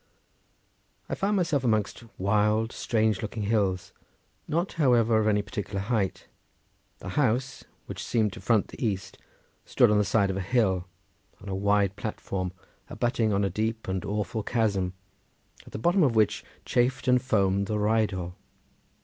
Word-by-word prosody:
I - - -2
found 205 +1 0
myself 165 -7 +1
amongst 110 -1 0
wild, 105 +3 +2
strange 110 -3 0
looking 110 0 -4
hills, 100 -4 0 0.5
not, 170 +5 -1
however, 120 -4 +4
of 110 - +1
any 105 -1 +2
particular 105 -4 -4
height. 100 -1 -1 0.7
The 90 - -8
house, 130 +3 0 0.2
which - - -6
seemed 110 -4 +1
to - - -9
front 110 +1 +2
the - - -8
east, 100 -4 -3 0.4
stood - - +3
on 105 - +4
the - - +3
side 100 -1 +2
of 95 - -3
a - - -2
hill 95 -5 +1 0.5
on 100 - -9
a 95 - -2
wide 100 0 +2
platform 95 -3 -4 0.4
abutting 120 -3 0
on 100 0 +1
a 100 - +1
deep 110 +3 -2
and 95 -1 -2
awful 105 +2 -2
chasm, 100 -5 0 0.7
at - - -12
the - - -5
bottom 175 - +2
of 130 -7 +3
which 105 -1 +2 0.2
chafed 125 +1 +1
and 125 -1 +4
foamed 100 -5 +1
the 105 - -1
Rheidol. 105 -4 0
105 Hz, 160 wpm, -27 LUFS, 100-120 Hz, 0.7 s, however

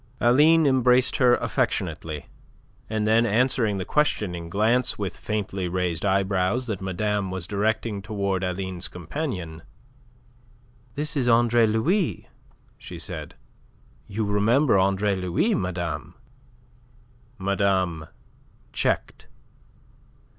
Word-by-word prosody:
Aline 150 +7 +5
embraced 130 -1 +3
her 125 -2 +5
affectionately, 90 - -2 0.6
and 110 -1 -1
then 110 +2 +4
answering 115 -1 +2
the 95 - -4
questioning 90 - 0
glance 110 +7 +1
with 100 -3 -4
faintly 100 -3 -3
raised 90 -2 -2
eyebrows 95 +3 +1
that 110 -5 -4
madame 100 +1 -1
was 95 -2 -3
directing 105 +1 -1
towards 100 -2 -2
Aline's 90 -1 -3
companion 90 - -5 1.3
"This 150 +3 -2
is 125 -4 +1
Andre 120 0 +4
Louis," 155 - 0 0.5
she - - -9
said. - - -7 0.7
"You 105 +2 -2
remember 105 +4 +3
Andre 100 +1 +1
Louis, 95 - 0
madame?" 85 - -3 1.2
Madame 95 -5 0 0.7
checked. - - -2
105 Hz, 100 wpm, -24 LUFS, 95-120 Hz, 1.3 s, Aline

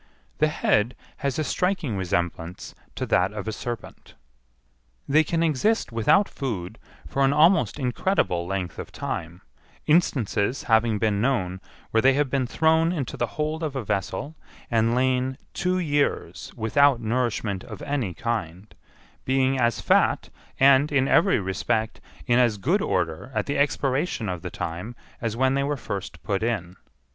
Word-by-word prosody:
The 155 - +4
head 120 -6 +1 0.2
has 140 -2 -2
a 155 - 0
striking 180 - -1
resemblance 85 -2 -3 0.2
to - - -2
that 90 +2 +2
of 105 0 -6
a - - -1
serpent. 120 0 -7 0.9
They 155 +3 +4
can 165 +2 0
exist 165 - +1
without 115 - +3
food 110 - -5 0.3
for 135 - 0
an 135 +1 +4
almost 150 - +4
incredible 125 - 0
length 90 -3 -3
of - - -7
time, 85 +3 -5 0.4
instances 130 - +1
having 110 -2 +3
been 105 -1 +1
known 95 -8 0 0.3
where 110 - +3
they 135 +2 +5
have 140 -1 0
been 135 -3 +1
thrown 160 +4 +3
into 145 -8 -3
the 120 - -1
hold 155 +1 -1
of 155 -4 -3
a 130 - -2
vessel 100 - -3 0.4
and 115 0 +2
lain 130 0 +1 0.2
two 180 0 0
years 145 -5 -1
without 135 +4 +3
nourishment 110 -4 -1
of 110 -4 -9
any 130 - -2
kind—being 120 +6 -3
as 120 -3 +1
fat, - - +2 0.3
and, 140 +2 +5
in 135 -2 +2
every 195 0 +4
respect, 110 +4 -2 0.2
in 120 0 +3
as 120 -4 +3
good 170 - +1
order 85 +6 -1
at 105 - 0
the 140 - -1
expiration 135 - 0
of 90 -2 -4
the - - -5
time 90 +9 -5 0.3
as 115 -1 -2
when 130 +1 +3
they 140 - +1
were 145 +1 -1
first 95 -8 -6
put 100 -1 -1
in. 100 -6 -2
120 Hz, 155 wpm, -25 LUFS, 105-145 Hz, 0.9 s, they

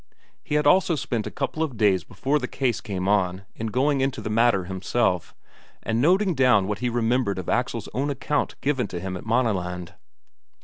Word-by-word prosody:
He 150 - -3
had 150 0 +2
also 175 +2 +4
spent 120 -5 -2
a - - -3
couple 145 +3 -3
of 145 -7 -2
days 100 -4 +3
before 145 +3 -1
the 125 - -3
case 125 -6 -1
came 95 -2 -4
on 95 -2 +1
in 115 - -4
going 135 +5 +1
into 135 -1 -1
the 110 - -4
matter 115 -3 +3
himself, 95 0 -1 0.5
and 115 +1 0
noting 185 +5 +3
down 125 -8 +4
what 105 -1 -2
he 125 0 0
remembered 120 -3 0
of 95 - -5
Axel's 120 -3 -1
own 140 +3 -1
account 145 +1 -2
given 135 -5 0
him 95 +1 -4
at 90 - -8
Maaneland. 90 -7 -1
120 Hz, 185 wpm, -24 LUFS, 100-135 Hz, 0.5 s, also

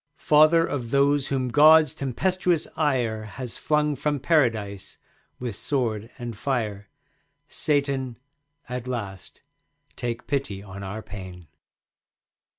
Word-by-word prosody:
Father 155 +2 +5
of 125 -7 -4
those 140 +1 +3
whom 130 -2 -1
God's 155 +3 +6
tempestuous 170 +5 0
ire 120 -8 0
Has 120 +3 -7
flung 150 -1 +1
from 145 +1 -1
Paradise 115 - 0 0.4
with 120 -5 -4
sword 115 -4 -2
and 120 -3 -6
fire, 105 -5 -2 0.6
Satan, 140 -4 -1 0.5
at 125 0 -5
last 100 -7 -6 0.5
take 120 -1 -4
pity 130 -9 -2
on 100 0 -9
our 100 +3 -6
pain. 95 -3 -9
125 Hz, 110 wpm, -25 LUFS, 110-145 Hz, 0.6 s, God's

